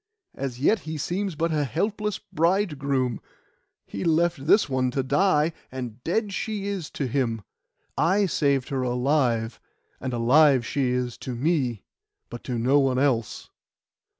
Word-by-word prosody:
As 130 Hz, -3 st, -5 dB
yet 205 Hz, +10 st, +3 dB
he 155 Hz, -2 st, -6 dB
seems 180 Hz, +4 st, -2 dB
but 165 Hz, +2 st, 0 dB
a 150 Hz, -2 st, +1 dB
helpless 205 Hz, -, -2 dB
bride 170 Hz, -1 st, 0 dB
groom. 130 Hz, -4 st, -1 dB, 0.6 s
He 100 Hz, -, -6 dB
left 165 Hz, -3 st, +1 dB
this 205 Hz, +1 st, +5 dB
one 130 Hz, -2 st, 0 dB
to 135 Hz, +1 st, -1 dB
die, 160 Hz, +1 st, +2 dB, 0.2 s
and 125 Hz, -2 st, -7 dB
dead 205 Hz, +4 st, -1 dB
she 210 Hz, -1 st, -3 dB
is 195 Hz, -6 st, -3 dB
to 140 Hz, -, -1 dB
him. 120 Hz, -4 st, -1 dB, 0.5 s
I 195 Hz, +4 st, +3 dB
saved 140 Hz, -7 st, +1 dB
her 135 Hz, -2 st, -1 dB
alive, 125 Hz, -3 st, 0 dB, 0.4 s
and 130 Hz, -, -4 dB
alive 130 Hz, +2 st, +4 dB
she 130 Hz, 0 st, 0 dB
is 125 Hz, -1 st, -2 dB
to 125 Hz, -, -5 dB
me, 130 Hz, -, 0 dB, 0.5 s
but 120 Hz, -, -8 dB
to 125 Hz, -2 st, -2 dB
no 130 Hz, +5 st, +3 dB
one 135 Hz, -2 st, +2 dB
else. 130 Hz, -5 st, 0 dB
140 Hz, 150 wpm, -25 LUFS, 125-170 Hz, 0.6 s, this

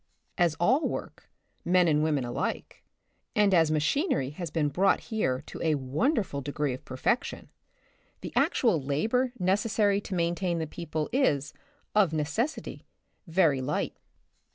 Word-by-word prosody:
As 170 Hz, -3 st, +2 dB
all 250 Hz, -, +2 dB
work, -, -, -7 dB, 0.3 s
men 180 Hz, 0 st, +4 dB
and 150 Hz, -2 st, +3 dB
women 150 Hz, -4 st, +1 dB
alike, 120 Hz, -, -4 dB, 0.5 s
and 205 Hz, -2 st, +4 dB
as 165 Hz, -3 st, +5 dB
machinery 155 Hz, -, +1 dB
has 170 Hz, +2 st, -5 dB
been 150 Hz, -1 st, 0 dB
brought 185 Hz, +7 st, +3 dB
here 150 Hz, -, -2 dB
to -, -, -9 dB
a 160 Hz, -2 st, +2 dB
wonderful 145 Hz, -, -1 dB
degree 145 Hz, 0 st, -2 dB
of 130 Hz, -, -8 dB
perfection, 130 Hz, -, -2 dB, 0.7 s
the -, -, -7 dB
actual 215 Hz, -, +2 dB
labor 220 Hz, -, 0 dB
necessary 205 Hz, +2 st, +2 dB
to 195 Hz, -, -5 dB
main 170 Hz, -1 st, +1 dB
tain 175 Hz, -1 st, -1 dB
the 160 Hz, -, -1 dB
people 155 Hz, -1 st, -4 dB
is, 150 Hz, -, +1 dB, 0.4 s
of 195 Hz, -6 st, +3 dB
necessity, 160 Hz, -, -2 dB, 0.4 s
very 165 Hz, -6 st, +3 dB
light. 130 Hz, -, -2 dB
170 Hz, 140 wpm, -28 LUFS, 145-205 Hz, 0.7 s, as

